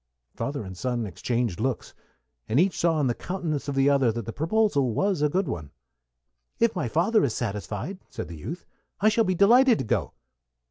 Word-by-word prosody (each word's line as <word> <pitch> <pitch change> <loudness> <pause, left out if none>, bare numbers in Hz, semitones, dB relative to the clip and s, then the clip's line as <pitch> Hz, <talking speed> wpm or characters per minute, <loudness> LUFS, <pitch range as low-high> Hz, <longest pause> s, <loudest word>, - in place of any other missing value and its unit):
Father 140 -4 -3
and 95 -1 -8
son 120 +3 -2
exchanged 115 +1 -2
looks, - - -2 0.6
and 120 - +3
each 185 +2 +3
saw 165 -2 +1
in 145 - +2
the 120 - +2
countenance 165 -2 -4
of 140 - -2
the 135 0 +3
other 135 -4 +4
that 115 -1 -5
the 115 - -5
proposal 160 - +1
was 195 -5 +1
a 150 - +3
good 185 +5 0
one. 80 -5 -5 0.9
"If 230 -2 +2
my 180 - -1
father 180 - +2
is 120 -6 0
satisfied," 110 - -4
said - - -6
the 85 - -8
youth, 165 - -7 0.3
"I 215 - +5
shall 225 +1 +2
be 185 -1 +1
delighted 235 +5 +6
to - - -2
go." - - -1
145 Hz, 195 wpm, -26 LUFS, 115-190 Hz, 0.9 s, delighted